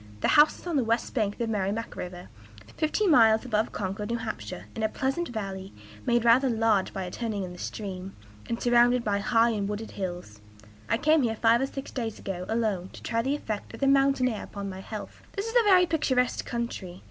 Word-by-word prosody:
The - - +2
house 300 +1 +6
is - - -15
on 340 -4 0
the 265 - +2
west 230 +1 0
bank 210 -4 -1
of 235 - 0
Merrimac 210 +1 -2
River, 180 0 -7 0.5
fifteen 340 +5 +1
miles 220 -4 +5
above 215 -3 0
Concord 205 +3 -4
(N. 230 -1 -3
H.), 105 - -5 0.2
in - - -4
a 220 - +1
pleasant 270 +9 -1
valley, 195 -4 -5 0.3
made 240 -1 +2
rather 250 +3 +5
large 225 -4 +2
by 190 - -4
a 180 - -6
turn 230 +1 -3
in 190 -3 -4
the 180 - -12
stream, 190 -2 -6 0.3
and 230 - -2
surrounded 240 0 +4
by 205 -2 0
high 230 +3 +3
and 205 -2 -2
wooded 210 +2 -5
hills. 175 - -6 0.5
I 230 - +3
came 310 +4 +4
here 230 -3 0
five 230 +2 +4
or 270 - +1
six 275 0 -7
days 225 -4 -4
ago, 180 -2 -5
alone, 215 -5 -1
to - - -12
try 230 -1 0
the 270 +4 0
effect 215 -8 -5
of - - -12
the 275 - +1
mountain 275 -1 +4
air 220 -4 -3
upon 200 -1 -6
my 190 - -8
health. 210 +2 -8
"This 400 0 -3
is 455 +1 -5
a 460 -4 +5
very 365 -2 +7
picturesque 260 -7 0
country. 210 -7 -4
225 Hz, 215 wpm, -27 LUFS, 200-250 Hz, 0.5 s, very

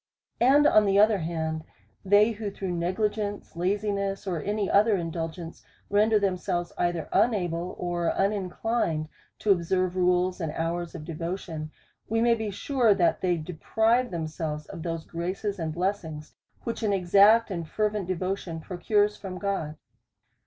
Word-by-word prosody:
And 275 +5 +5
on 215 -7 +6
the 195 0 +3
other 210 0 +5
hand, 160 -1 -3 0.4
they 205 +3 +5
who 215 -1 -4
through 195 -2 -5
negli 180 +5 0
gence, 205 -3 -5
laziness, 200 +2 -1
or 175 -5 -2
any 205 +3 -1
other 210 +2 +4
indulgence, 165 -1 -5 0.3
render 215 +2 +4
them 195 -3 +1
selves 175 -1 -3
either 175 -2 -1
unable, 180 -6 +1
or 175 -1 -1
uninclined 195 -4 0 0.3
to 210 - +1
observe 185 0 +1
rules 180 0 +2
and 160 -2 -2
hours 170 +1 -3
of 155 - -7
devotion, 165 -1 -5 0.4
we 225 +1 +1
may 235 +1 +4
be 220 -2 -2
sure, 230 +1 +2
that 165 -3 +2
they 180 -2 +1
deprive 220 +9 +1
themselves 155 -2 -4
of 165 - -9
those 165 -1 -4
graces 185 +4 -3
and 160 -1 -2
blessings 170 -3 -3 0.3
which 230 - -4
an 210 -2 +1
exact 200 +5 +5
and 170 -4 -4
fervent 210 -3 -1
devotion 185 -2 -3
procures 205 +5 +1
from 185 -2 -7
God. 180 -6 -3
185 Hz, 150 wpm, -27 LUFS, 170-205 Hz, 0.4 s, on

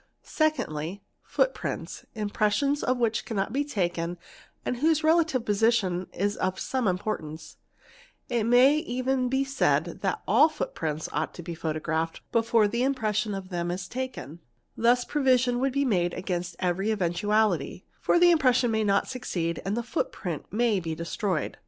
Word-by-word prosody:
Secondly, 195 - -1 0.2
footprints, - - -2
_ - - -8
impressions 215 +7 +1
of 255 0 +1
which 230 -2 0
cannot 220 -1 -2
be 280 +2 +1
taken 175 - -2 0.5
and 250 - -1
whose 310 +3 +2
relative 315 -6 +3
position 205 -4 +1
is 205 +2 -1
of, 185 0 -1
some 255 -4 -1
importance; 180 -5 -3 0.7
it 235 -3 0
may 250 +5 +6
even 255 -3 -1
be 265 +1 +1
said 275 +1 0
that - - -1
all 315 - +6
footprints 160 - -3
ought - - -2
to 175 - -8
be 175 - -6
mee 160 -1 -3
erephed 160 +1 -2
before 230 -2 +3
the 235 +4 -1
impression 215 -6 0
of 190 -1 -7
them 175 -1 -2
is 180 +1 -4
taken; 245 - -6 0.4
thus 245 +2 +3
provision 255 -4 +2
'would 270 +1 +1
be 280 +1 +1
made 175 -7 +1
against 180 -2 -3
every 185 +3 0
eventuality, 200 -3 0
for - - +2
the 350 0 +6
impression 255 -7 +3
may 220 0 +1
not 200 -1 +3
Bicsea 175 -10 -3
and 200 +3 -2
the 240 - -1
footprint 180 - -4
may 225 -2 +2
be 165 -2 -4
destroyed. 170 +1 -2
215 Hz, 160 wpm, -27 LUFS, 180-255 Hz, 0.7 s, may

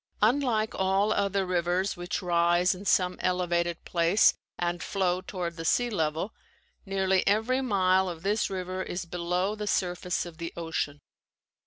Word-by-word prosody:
Unlike 225 -2 +2
all 195 +3 +2
other 200 -1 0
rivers 180 +2 0
which 175 +2 -4
rise 175 +1 +3
in 190 +2 -10
some 180 -2 +2
elevated 175 -2 0
place 175 +4 +4 0.2
and 175 0 -2
flow 185 -1 0
toward 180 -3 -5
the 165 - -5
sea 245 +8 +2
level, 165 +2 -1 0.5
nearly 190 -1 +2
every 220 +6 +2
mile 190 -5 +2
of 165 -1 -8
this 210 +2 +1
river 185 -1 -4
is 175 -1 -4
below 180 +3 -1
the 210 -1 -5
surface 180 -2 -1
of 170 -2 -11
the 170 0 -4
ocean. 160 -3 -3
185 Hz, 150 wpm, -28 LUFS, 175-200 Hz, 0.5 s, place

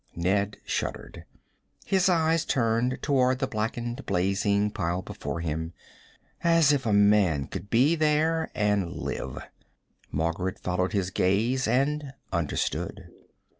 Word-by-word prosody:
Ned 100 +4 0
shuddered. - - -4 0.6
His 190 -1 +2
eyes 165 -2 +2
turned 120 -2 +1
toward 130 -3 +2
the 135 - 0
blackened, 120 +1 -3
blazing 100 +2 +1
pile 90 -2 -2
before 85 - -5
him 80 +1 -3 0.7
as 165 -4 +5
if 130 -4 -1
a - - +2
man 100 -8 +4
could 100 - -7
be 130 +9 +4
there, 155 +1 +1
and 105 -4 +1
live! - - -5 0.7
Margaret 85 +4 -1
followed 90 +2 -1
his 95 -2 0
gaze 115 +10 +1
and 140 +3 0 0.2
understood. 85 -4 -2
105 Hz, 120 wpm, -27 LUFS, 95-135 Hz, 0.7 s, as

